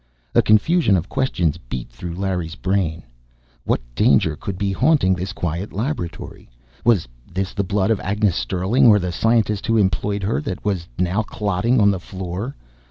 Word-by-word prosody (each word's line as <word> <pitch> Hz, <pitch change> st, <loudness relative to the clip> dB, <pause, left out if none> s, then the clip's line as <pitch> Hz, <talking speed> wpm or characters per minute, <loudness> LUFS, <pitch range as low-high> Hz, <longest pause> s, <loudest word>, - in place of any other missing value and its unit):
A -, -, +6 dB
confusion 110 Hz, -, +4 dB
of 90 Hz, +3 st, -4 dB
questions 85 Hz, -, 0 dB
beat -, -, -5 dB
through 85 Hz, +8 st, -7 dB
Larry's 90 Hz, -3 st, -2 dB
brain. 90 Hz, -4 st, -1 dB, 0.6 s
What -, -, +1 dB
danger 75 Hz, +5 st, +3 dB
could 90 Hz, +5 st, -5 dB
be 100 Hz, +1 st, -1 dB
haunting 130 Hz, -3 st, +3 dB
this 90 Hz, +1 st, -3 dB
quiet 85 Hz, +4 st, -3 dB
laboratory? 110 Hz, -, -5 dB, 0.3 s
Was 105 Hz, -, +3 dB, 0.2 s
this 95 Hz, +1 st, -2 dB
the 100 Hz, -, -1 dB
blood 100 Hz, +2 st, 0 dB
of 110 Hz, -, +1 dB
Agnes 100 Hz, -1 st, 0 dB
Sterling 95 Hz, -, +2 dB
or 105 Hz, -2 st, +7 dB
the 90 Hz, -3 st, -2 dB
scientist 110 Hz, +2 st, +1 dB
who 115 Hz, -1 st, +3 dB
employed 100 Hz, 0 st, 0 dB
her 105 Hz, +8 st, 0 dB
that 100 Hz, -11 st, -5 dB
was 95 Hz, -5 st, -1 dB
now 90 Hz, +4 st, +1 dB
clotting 105 Hz, +3 st, 0 dB
on 100 Hz, -1 st, +5 dB
the 95 Hz, -, -2 dB
floor? 95 Hz, +7 st, -5 dB
95 Hz, 165 wpm, -21 LUFS, 90-105 Hz, 0.6 s, or